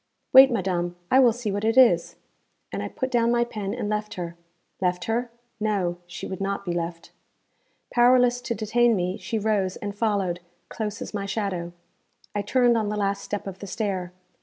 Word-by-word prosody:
'Wait, 265 Hz, +1 st, +10 dB
madam; 180 Hz, -6 st, -1 dB, 0.2 s
I 260 Hz, -, +6 dB
will 250 Hz, -3 st, +6 dB
see 225 Hz, -2 st, -3 dB
what 205 Hz, +1 st, -2 dB
it 225 Hz, +2 st, +1 dB
is.' 180 Hz, -10 st, +5 dB, 0.6 s
And -, -, -3 dB
I -, -, -3 dB
put 260 Hz, 0 st, -4 dB
down 235 Hz, -2 st, +3 dB
my 240 Hz, 0 st, +3 dB
pen 210 Hz, -4 st, -4 dB
and 235 Hz, -4 st, -3 dB
left 210 Hz, 0 st, -2 dB
her. 170 Hz, -2 st, -5 dB, 0.5 s
Left 180 Hz, -1 st, 0 dB
her? 235 Hz, +2 st, -1 dB, 0.3 s
No. 195 Hz, -5 st, 0 dB
She 180 Hz, 0 st, -7 dB
would 190 Hz, 0 st, -6 dB
not 200 Hz, 0 st, -2 dB
be 175 Hz, -, -1 dB
left. 170 Hz, 0 st, -4 dB, 0.8 s
Powerless 245 Hz, 0 st, +4 dB
to 235 Hz, -, -3 dB
detain 230 Hz, +2 st, +2 dB
me, 180 Hz, +1 st, -1 dB
she 225 Hz, -, -3 dB
rose 205 Hz, -3 st, 0 dB
and 205 Hz, -1 st, -5 dB
followed, 200 Hz, -5 st, 0 dB, 0.3 s
close 210 Hz, -2 st, -4 dB
as -, -, -9 dB
my 200 Hz, -1 st, -3 dB
shadow. 195 Hz, -4 st, -2 dB, 0.6 s
I 205 Hz, -, 0 dB
turned 240 Hz, +2 st, +3 dB
on 210 Hz, -2 st, -1 dB
the 210 Hz, -, -2 dB
last 200 Hz, -1 st, 0 dB
step 205 Hz, -, -4 dB
of 195 Hz, -1 st, -7 dB
the 200 Hz, -, -7 dB
stair. 190 Hz, -3 st, -3 dB
205 Hz, 190 wpm, -25 LUFS, 185-235 Hz, 0.8 s, Wait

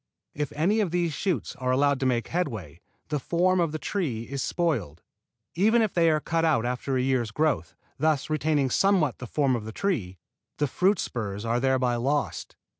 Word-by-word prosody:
If 145 Hz, -1 st, -3 dB
any 180 Hz, +9 st, +2 dB
of 205 Hz, -5 st, +1 dB
these 170 Hz, -1 st, 0 dB
shoots 175 Hz, -, -2 dB
are 125 Hz, 0 st, -2 dB
allowed 140 Hz, +1 st, +3 dB
to 130 Hz, -, +1 dB
make 120 Hz, -2 st, 0 dB
headway, 115 Hz, -, -3 dB, 0.3 s
the 150 Hz, -, 0 dB
form 180 Hz, +5 st, +2 dB
of 170 Hz, -3 st, +1 dB
the 155 Hz, -, -3 dB
tree 155 Hz, -, -2 dB
is 140 Hz, +3 st, -5 dB
spoiled. 125 Hz, -, -1 dB, 0.5 s
Even 220 Hz, +6 st, +3 dB
if 215 Hz, -, -1 dB
they 165 Hz, -2 st, +4 dB
are 155 Hz, -1 st, +2 dB
cut 165 Hz, +2 st, -1 dB
out 150 Hz, -8 st, +2 dB
after 125 Hz, +2 st, -1 dB
a -, -, +1 dB
year's 130 Hz, -4 st, +1 dB
growth, 145 Hz, -, 0 dB, 0.2 s
thus 155 Hz, -3 st, +1 dB
retaining 150 Hz, -3 st, +1 dB
somewhat 185 Hz, -9 st, +2 dB
the 125 Hz, -, -6 dB
form 135 Hz, 0 st, +1 dB
of 115 Hz, -, -4 dB
the 110 Hz, -, -6 dB
tree, 110 Hz, -, -2 dB, 0.4 s
the 150 Hz, -, +1 dB
fruit 185 Hz, +8 st, +2 dB
spurs 105 Hz, -3 st, -4 dB
are 115 Hz, +1 st, +1 dB
thereby 130 Hz, -2 st, +1 dB
lost. 140 Hz, +4 st, -2 dB
145 Hz, 190 wpm, -26 LUFS, 125-170 Hz, 0.5 s, they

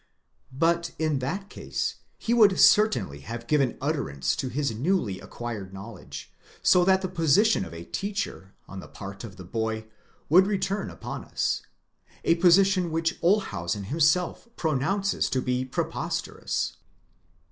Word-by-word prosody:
But 170 Hz, +3 st, +1 dB
in 155 Hz, -3 st, 0 dB
that 190 Hz, +10 st, -3 dB
case -, -, -3 dB, 0.2 s
he 230 Hz, -, -1 dB
would 210 Hz, -5 st, +5 dB
certainly 125 Hz, -, +4 dB
have 115 Hz, +9 st, -7 dB
given 135 Hz, -2 st, +1 dB
utterance 70 Hz, -1 st, -1 dB
to 130 Hz, -, -2 dB
his 140 Hz, 0 st, -1 dB
newly 120 Hz, -, 0 dB
acquired 100 Hz, -1 st, -7 dB
knowledge; 105 Hz, +4 st, -9 dB, 0.3 s
so 180 Hz, -, +6 dB
that 190 Hz, +1 st, +3 dB
the -, -, 0 dB
position 180 Hz, -, +3 dB
of -, -, -10 dB
a 85 Hz, 0 st, -8 dB
teacher 195 Hz, -, -4 dB
on 95 Hz, -, -8 dB
the -, -, -10 dB
part 100 Hz, -1 st, -9 dB
of 105 Hz, -4 st, -8 dB
the 95 Hz, -, -9 dB
boy 110 Hz, +3 st, -3 dB, 0.4 s
would 185 Hz, +5 st, +6 dB
return 200 Hz, 0 st, -1 dB
upon -, -, -7 dB
us, -, -, -1 dB, 0.6 s
a -, -, +4 dB
position 185 Hz, +1 st, +4 dB
which 165 Hz, +1 st, -1 dB
Olshausen 105 Hz, -, +1 dB
himself 160 Hz, -, +1 dB
pronounces 180 Hz, +7 st, 0 dB
to 130 Hz, -, 0 dB
be 125 Hz, 0 st, 0 dB
preposterous. 130 Hz, -, -3 dB
150 Hz, 140 wpm, -26 LUFS, -, 0.6 s, so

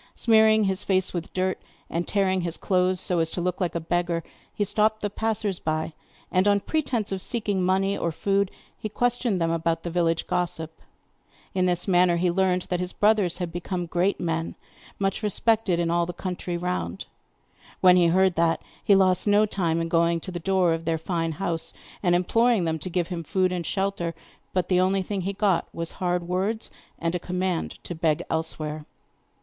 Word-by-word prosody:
Smearing 220 Hz, -1 st, +5 dB
his 190 Hz, 0 st, 0 dB
face 190 Hz, -1 st, 0 dB
with 170 Hz, -2 st, -4 dB
dirt, 185 Hz, 0 st, -1 dB, 0.3 s
and 170 Hz, +1 st, -3 dB
tearing 190 Hz, -2 st, +1 dB
his 170 Hz, -1 st, -3 dB
clothes 185 Hz, -1 st, +1 dB
so 180 Hz, -2 st, 0 dB
as 165 Hz, -1 st, +1 dB
to 175 Hz, -, -4 dB
look 180 Hz, +1 st, -2 dB
like 175 Hz, -2 st, -1 dB
a -, -, +1 dB
beggar, 170 Hz, 0 st, -1 dB, 0.3 s
he 205 Hz, -, -1 dB
stopped 215 Hz, +2 st, +1 dB
the 205 Hz, -, -2 dB
passers 215 Hz, -3 st, -1 dB
by 155 Hz, 0 st, -2 dB, 0.4 s
and, 185 Hz, +2 st, +3 dB
on 200 Hz, 0 st, +4 dB
pretence 250 Hz, -5 st, -1 dB
of 190 Hz, -1 st, -2 dB
seeking 205 Hz, -4 st, -1 dB
money 190 Hz, +2 st, +2 dB
or 170 Hz, -, -1 dB
food, 195 Hz, +4 st, +1 dB, 0.3 s
he 215 Hz, -, -5 dB
questioned 240 Hz, -2 st, 0 dB
them 165 Hz, -1 st, +1 dB
about 165 Hz, 0 st, 0 dB
the 170 Hz, -, -4 dB
village 165 Hz, -1 st, +1 dB
gossip. 160 Hz, -2 st, -3 dB, 0.7 s
In 185 Hz, -1 st, +2 dB
this 175 Hz, +1 st, 0 dB
manner 180 Hz, -2 st, +4 dB
he 175 Hz, 0 st, +2 dB
learned 185 Hz, 0 st, +1 dB
that 180 Hz, -2 st, -2 dB
his 180 Hz, 0 st, -3 dB
brothers 205 Hz, -4 st, +2 dB
had 175 Hz, -2 st, -3 dB
become 175 Hz, +1 st, -3 dB
great 175 Hz, +4 st, 0 dB
men, 165 Hz, -1 st, -2 dB, 0.4 s
much 195 Hz, 0 st, -1 dB
respected 215 Hz, -3 st, +2 dB
in 170 Hz, -1 st, +1 dB
all 170 Hz, 0 st, +1 dB
the 175 Hz, -, -4 dB
country 180 Hz, -1 st, -4 dB
round. 180 Hz, +1 st, -3 dB, 0.7 s
When 180 Hz, -1 st, +7 dB
he 175 Hz, -2 st, +5 dB
heard 185 Hz, +2 st, +4 dB
that, 165 Hz, 0 st, +2 dB, 0.2 s
he 200 Hz, -, +5 dB
lost 185 Hz, 0 st, +3 dB
no 205 Hz, +1 st, +5 dB
time 170 Hz, -5 st, 0 dB
in 165 Hz, -, -1 dB
going 170 Hz, 0 st, +2 dB
to 185 Hz, -, -6 dB
the 175 Hz, -, -4 dB
door 185 Hz, -1 st, +2 dB
of 165 Hz, 0 st, -4 dB
their 165 Hz, 0 st, +1 dB
fine 165 Hz, 0 st, -2 dB
house 170 Hz, -1 st, -3 dB, 0.3 s
and 175 Hz, -3 st, +3 dB
imploring 225 Hz, +3 st, +3 dB
them 160 Hz, -1 st, -1 dB
to 185 Hz, -, -5 dB
give 175 Hz, -1 st, -1 dB
him 170 Hz, -2 st, -4 dB
food 185 Hz, +3 st, +1 dB
and 180 Hz, -1 st, -2 dB
shelter; 190 Hz, -4 st, -1 dB, 0.4 s
but 185 Hz, -2 st, 0 dB
the 180 Hz, -1 st, +3 dB
only 190 Hz, +1 st, +2 dB
thing 195 Hz, +1 st, -3 dB
he 195 Hz, +2 st, -2 dB
got 195 Hz, -4 st, +1 dB
was 165 Hz, 0 st, -4 dB
hard 175 Hz, -1 st, 0 dB
words, 195 Hz, +5 st, -1 dB, 0.3 s
and 165 Hz, 0 st, -1 dB
a 180 Hz, -, -1 dB
command 180 Hz, -1 st, -2 dB
to -, -, -5 dB
beg 160 Hz, -2 st, 0 dB
elsewhere. 155 Hz, -1 st, -3 dB
180 Hz, 195 wpm, -25 LUFS, 170-195 Hz, 0.7 s, When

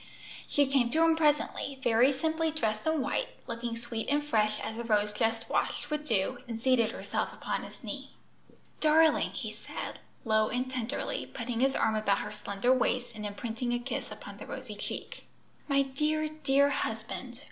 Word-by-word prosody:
She 285 Hz, -, +3 dB
came 265 Hz, -3 st, +2 dB
to 320 Hz, +5 st, +3 dB
him 325 Hz, 0 st, +5 dB
presently, 295 Hz, -3 st, +1 dB
very 240 Hz, +3 st, +5 dB
simply 320 Hz, +4 st, 0 dB
dressed 220 Hz, -6 st, -1 dB
in 315 Hz, -2 st, +2 dB
white, 290 Hz, -, 0 dB, 0.2 s
looking 230 Hz, 0 st, -3 dB
sweet 230 Hz, -1 st, -4 dB
and 290 Hz, +1 st, +2 dB
fresh 215 Hz, -6 st, +2 dB
as 220 Hz, -, -4 dB
a -, -, -2 dB
rose 210 Hz, -2 st, +2 dB
just 225 Hz, +1 st, 0 dB
washed 290 Hz, -, -1 dB
with 300 Hz, 0 st, -2 dB
dew, 225 Hz, +3 st, +1 dB
and 230 Hz, -2 st, -4 dB
seated 240 Hz, -2 st, +3 dB
herself -, -, -2 dB
upon -, -, -3 dB
his -, -, -11 dB
knee. -, -, -5 dB, 0.7 s
"Darling!" 315 Hz, 0 st, +5 dB
he -, -, -5 dB
said, -, -, -7 dB, 0.3 s
low 215 Hz, -1 st, +3 dB
and 255 Hz, +1 st, -1 dB
tenderly, 255 Hz, +1 st, -2 dB
putting 230 Hz, 0 st, -4 dB
his 270 Hz, +1 st, +3 dB
arm 220 Hz, -, +2 dB
about 215 Hz, -2 st, +2 dB
her 210 Hz, -, -4 dB
slender 210 Hz, +3 st, +1 dB
waist 250 Hz, -1 st, +1 dB
and 210 Hz, -1 st, -4 dB
imprinting 230 Hz, +4 st, -3 dB
a -, -, +2 dB
kiss 240 Hz, +2 st, -4 dB
upon -, -, -9 dB
the -, -, -9 dB
rosy -, -, -6 dB
cheek. -, -, -6 dB, 0.4 s
"My 275 Hz, -1 st, +4 dB
dear, 305 Hz, +3 st, 0 dB
dear 285 Hz, -2 st, +3 dB
husband! 230 Hz, +1 st, -3 dB
245 Hz, 180 wpm, -30 LUFS, 225-285 Hz, 0.7 s, him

